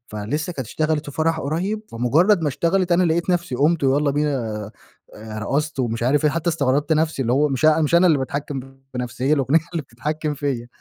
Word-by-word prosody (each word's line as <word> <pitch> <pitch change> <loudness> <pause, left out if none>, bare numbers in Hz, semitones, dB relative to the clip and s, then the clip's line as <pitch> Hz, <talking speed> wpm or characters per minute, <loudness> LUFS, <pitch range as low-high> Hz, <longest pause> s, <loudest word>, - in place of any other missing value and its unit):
فلسه 135 +12 -3
كانت 130 -7 -5
اشتغلت 155 -1 -1
في - - -14
فرح 160 0 +1
قريب، 185 +9 -2
فمجرد 160 - +3
ما 150 - +1
اشتغلت 175 +6 +1
أنا 175 +2 +4
لقيت 170 +1 +1
نفسي 175 -7 -1
قُمت 150 +3 +2
ويلّا 140 +2 +2
بينا 125 -8 -2 0.4
آآ 110 0 -8
رقصت 140 +8 -2
ومش 115 -2 -2
عارف 140 +5 +2
إيه، 150 - +4
حتّى 165 +3 -1
استغربت 145 0 +1
نفسي 155 -2 +1
اللي 120 -1 0
هو 145 +3 +3
مش 135 +1 -2
أ 155 +1 +5
مش 155 +1 +1
أنا 175 +2 +6
اللي 155 -4 +4
باتحكم 140 +1 -3
في 135 0 -12
نفسي 125 0 -4
هى - - +4
الأغنية 140 +2 +3
اللي 165 -3 -2
بتتحكم 150 +5 -4
فيَّ. 135 -4 -3
145 Hz, 210 wpm, -21 LUFS, 130-160 Hz, 0.4 s, أنا